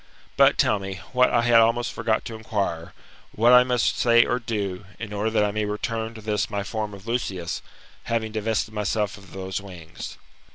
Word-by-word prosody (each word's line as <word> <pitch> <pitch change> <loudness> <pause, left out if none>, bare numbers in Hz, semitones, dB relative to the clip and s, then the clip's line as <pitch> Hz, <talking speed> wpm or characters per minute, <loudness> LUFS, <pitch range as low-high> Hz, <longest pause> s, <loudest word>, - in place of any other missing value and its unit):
But, - - +5
tell 105 - +3
me, 95 0 -5 0.2
what 125 0 +5
I 120 - +2
had 120 -1 +6
almost 115 +2 +2
forgot 110 -1 0
to 115 - -6
inquire, 100 -7 -3 0.4
what 120 +3 +5
I 125 0 +9
muse 125 -1 0
say 120 -1 +4
or 125 - 0
do, 100 -5 -3
in 110 -3 -6
order 105 +2 0
that 110 -1 +2
I 105 - 0
may 105 +1 -1
return 110 +2 -3
to 110 - -9
this 105 -1 -1
my 100 -1 -2
form 105 0 -4
of 100 +1 -14
Lucius, 100 -8 -2 0.4
having 115 -1 -1
divested 110 0 -1
myself 105 0 -1
of 100 -2 -16
those 95 0 -4
wings 90 -4 -9
110 Hz, 195 wpm, -24 LUFS, 100-115 Hz, 0.4 s, I